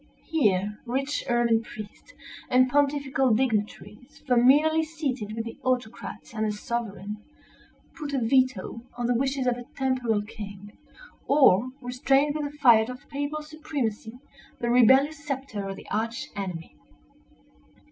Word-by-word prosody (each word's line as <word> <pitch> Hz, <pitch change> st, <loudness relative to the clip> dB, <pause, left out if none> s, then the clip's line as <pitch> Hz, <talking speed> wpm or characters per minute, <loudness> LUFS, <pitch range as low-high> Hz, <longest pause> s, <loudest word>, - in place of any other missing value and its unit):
Here, 210 Hz, -, +1 dB
rich 275 Hz, +4 st, -1 dB
ermined 235 Hz, -1 st, +3 dB
priests, 215 Hz, -2 st, -11 dB, 0.4 s
and 255 Hz, +1 st, +5 dB
pontifical 275 Hz, -4 st, +2 dB
dignitaries, 215 Hz, 0 st, -3 dB
familiarly 285 Hz, +5 st, +5 dB
seated 275 Hz, -9 st, -4 dB
with 225 Hz, 0 st, -3 dB
the 230 Hz, -, -8 dB
autocrat 245 Hz, -3 st, -3 dB
and 220 Hz, -1 st, -1 dB
the -, -, 0 dB
sovereign, 210 Hz, -2 st, -4 dB, 0.8 s
put 295 Hz, -2 st, -5 dB
a 280 Hz, -, 0 dB
veto 250 Hz, -3 st, +1 dB, 0.2 s
on 240 Hz, -, -2 dB
the 245 Hz, -, +2 dB
wishes 265 Hz, +2 st, 0 dB
of 245 Hz, -1 st, +1 dB
a 245 Hz, -, -9 dB
temporal 255 Hz, -6 st, 0 dB
king, 205 Hz, -2 st, -9 dB, 0.5 s
or 255 Hz, -5 st, +5 dB
restrained 270 Hz, +3 st, +2 dB
with 295 Hz, -1 st, -3 dB
the 295 Hz, -, -17 dB
fiat 235 Hz, -5 st, +5 dB
of 250 Hz, +3 st, -9 dB
papal 290 Hz, +2 st, -3 dB
supremacy 275 Hz, -7 st, -4 dB, 0.4 s
the 235 Hz, 0 st, 0 dB
rebellious 265 Hz, +5 st, +5 dB
sceptre 265 Hz, -8 st, -4 dB
of 195 Hz, -, -4 dB
the -, -, -12 dB
Arch 225 Hz, +2 st, -2 dB
enemy. 180 Hz, -5 st, -5 dB
245 Hz, 135 wpm, -26 LUFS, 220-275 Hz, 0.8 s, and